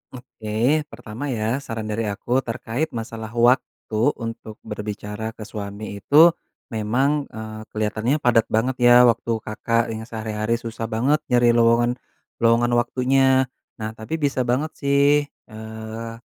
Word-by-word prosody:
Oke, 120 -3 -11 0.4
pertama 120 +1 -7
ya 115 0 -1
saran 115 -6 -5
dari 110 +1 -1
aku 120 +5 0
terkait 120 +3 -3
masalah 115 -1 -5
waktu 120 -2 +1 0.2
untuk 115 -2 -7
berbicara 105 +1 -5
ke 110 - -8
suami 100 -1 -7
itu 155 - +7 0.4
memang, 130 +7 0
eee, 110 0 -8
kelihatannya 110 +4 -1
padat 115 -2 +4
banget 120 +4 0
ya 120 0 +7
waktu 115 -1 +2
Kakak 115 +1 -1
yang 110 0 -6
sehari-hari 110 0 -2
susah 115 -1 -5
banget 125 +7 +1
nyari 120 -1 +4
lowongan 120 +1 +3 0.4
lowongan 115 +1 +3
waktunya. 130 +1 +2 0.3
Nah, 110 0 -3
tapi 110 +7 -5
bisa 140 -5 0
banget 140 +6 0
sih, 140 +1 +3
eee, 110 -1 -9
115 Hz, 135 wpm, -22 LUFS, 110-125 Hz, 0.4 s, itu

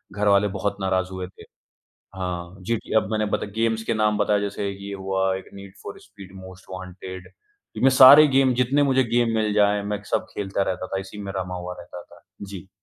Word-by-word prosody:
घरवाले 100 0 +3
बहुत 100 +2 -2
नाराज़ 95 -1 0
हुए 95 -1 -5
थे। 95 - -16 0.7
हाँ, 90 -1 -5
जीटीए 115 +4 -3
अब 105 - +1
मैंने 110 0 0
बता - - -4
गेम्स 115 0 0
के 115 - -1
नाम 105 -1 +1
बताए, 105 -1 +2
जैसे 100 0 -3
ये 100 0 -7
हुआ 95 0 -1
एक, - - -12
need 100 -1 -11
for - - -8
speed 100 -2 -14
most 95 0 -12
wanted. 95 0 -9 0.5
इ - - -4
मैं 135 - +7
सारे 135 +3 +9
गेम, 135 -2 +3
जितने 130 +4 +2
मुझे 135 -1 +3
गेम 120 -1 +2
मिल 110 -1 0
जाएँ, 105 -1 +2
मैं 105 +1 -3
सब - - 0
खेलता 100 -1 -2
रहता 95 0 -6
था। 95 - -3
इसी 95 +2 -9
में 100 - -5
रमा 90 0 -4
हुआ 90 0 -6
रहता 85 0 -10
था। - - -19 0.2
जी। 95 -2 -9
100 Hz, 205 wpm, -23 LUFS, 95-110 Hz, 0.7 s, सारे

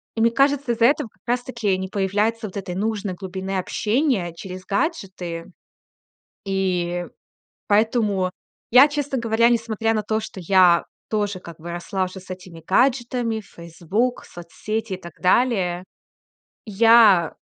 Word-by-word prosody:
И 225 - -1
мне 230 +1 +4
кажется, 275 0 +2
из-за 230 0 +2
этого 255 -2 +2
как - - -36
раз 245 +1 0
таки 230 -7 -1
не 190 0 -4
появляется 210 +4 0
вот 200 - -9
этой 180 -2 -5
нужной 205 -1 -2
глубины 190 +1 -5
общения 210 - 0
через 185 +2 -9
гаджеты. 195 - -3 1.0
И 180 -2 -1 0.6
поэтому 210 -3 +2 0.4
я, 255 +5 +8
честно 290 -2 -2
говоря, 230 0 +3
несмотря 225 -1 0
на 215 - 0
то, 215 +1 -1
что 210 -3 -8
я 180 -1 +4 0.3
тоже 205 -3 -1
как 170 -2 -11
бы 170 +2 -7
росла 175 +3 -2
уже 185 +1 -8
с 185 - -17
этими 180 -3 -9
гаджетами 240 0 +1
в 205 - -18
"Фейсбук", 175 +9 -2
соцсети 210 +4 -5
и - - -4
так 170 -2 -10
далее, 185 -4 +2 0.8
я 215 -5 +5
205 Hz, 145 wpm, -22 LUFS, 185-230 Hz, 1.0 s, я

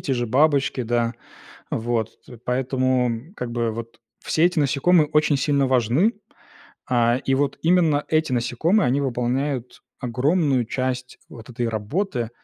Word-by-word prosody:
те 135 - -2
же 120 -1 -1
бабочки, 140 +1 +2
да. 120 0 0 0.6
Вот 115 -1 -2
т 120 - -13
поэтому, 130 - -1
как 125 - -4
бы, 115 -1 0
вот 115 +1 -8 0.2
все 160 - +1
эти 175 -1 +2
насекомые 150 +3 +3
очень 150 -1 +3
сильно 140 0 +1
важны. 130 - +2 0.8
А, 120 -1 +3
и 135 - +1
вот 140 0 0
именно 165 -4 +3
эти 155 -3 +1
насекомые, 125 - +1
они 135 +3 +1
выполняют 125 0 -2 0.2
огромную 135 +1 +1
часть 130 +1 -3
вот 115 +2 -12
этой 120 -1 -2
работы 115 - -2
130 Hz, 140 wpm, -23 LUFS, 120-145 Hz, 0.8 s, насекомые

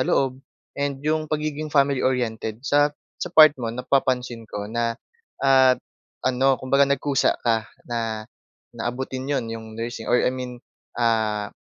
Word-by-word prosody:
loob 130 0 +1 0.4
and 140 -1 -1
'yong 155 0 0
pagiging 155 0 -2
family 140 -3 +2
oriented. 115 -4 -1
Sa 145 +1 +4 0.3
sa - - -2
part 155 -4 +8
mo, 115 - -2
napapansin 125 -1 -1
ko 105 0 -5
na 115 +2 -1 0.5
at 130 -1 +6 0.5
ano, 130 +1 +3
kumbaga 140 +1 +2
nagkusa 140 -1 +1
ka 115 -3 +1 0.2
na 115 -2 -3 0.5
na - - -7
abutin 130 +2 -4
'yon, 135 -4 0
'yong 110 -1 -8
nursing 115 0 -5
or 120 - +3
I 125 - +2
mean, 125 -1 -5 0.4
ah, 110 -3 0
130 Hz, 145 wpm, -24 LUFS, 115-140 Hz, 0.5 s, part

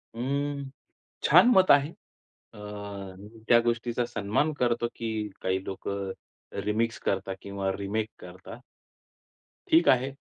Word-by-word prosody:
अं, 140 +3 -2 0.6
छान - - +7
मत 185 -1 +5
आहे. 140 0 +6 0.7
अ, - - -12 0.9
त्या 120 -1 +7
गोष्टीचा 120 +1 0
सन्मान 115 +6 0
करतो, 120 -1 +1
की 110 -2 -3
काही 95 0 0
लोकं 100 0 -4 0.5
रिमिक्स 115 +2 0
करतात 95 0 -1
किंवा 100 -1 -3
रिमेक 105 +2 -2
करतात. 90 +1 -11 1.1
ठीक 165 +1 +5
आहे. 130 +1 +3
115 Hz, 110 wpm, -28 LUFS, 100-130 Hz, 1.1 s, छान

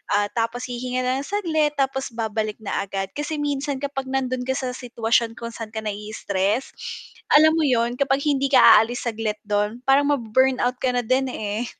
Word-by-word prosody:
ah, 205 0 +1
tapos 230 +1 -2
hihinga 250 +1 -3
na 255 +1 0
ng 280 - -6
saglit 315 -7 0
tapos 270 -1 -1
babalik 220 -2 -2
na 200 - -2
agad 195 0 -4
kasi 295 +1 -4
minsan 285 -1 -2
kapag 275 -1 -3
nandun 255 -1 -1
ka 265 - 0
sa 265 -1 -3
sitwasyon 230 -1 0
kung 235 0 -6
saan 225 -2 -8
ka 220 - -3
nai-istress, 210 +1 -2 0.6
alam 310 +1 +8
mo 320 - +2
yun 240 -2 +1
kapag 275 0 +1
hindi 275 -2 +2
ka 270 - +5 0.2
aalis 240 +3 0
saglit 220 -1 -3
dun 210 +3 -1
parang 275 +1 +4
ma-burn 260 0 +2
out 250 +1 0
ka 255 -1 +1
na 245 - +1
din, 260 +3 +1
eh. 215 -1 -3
250 Hz, 190 wpm, -23 LUFS, 220-270 Hz, 0.6 s, alam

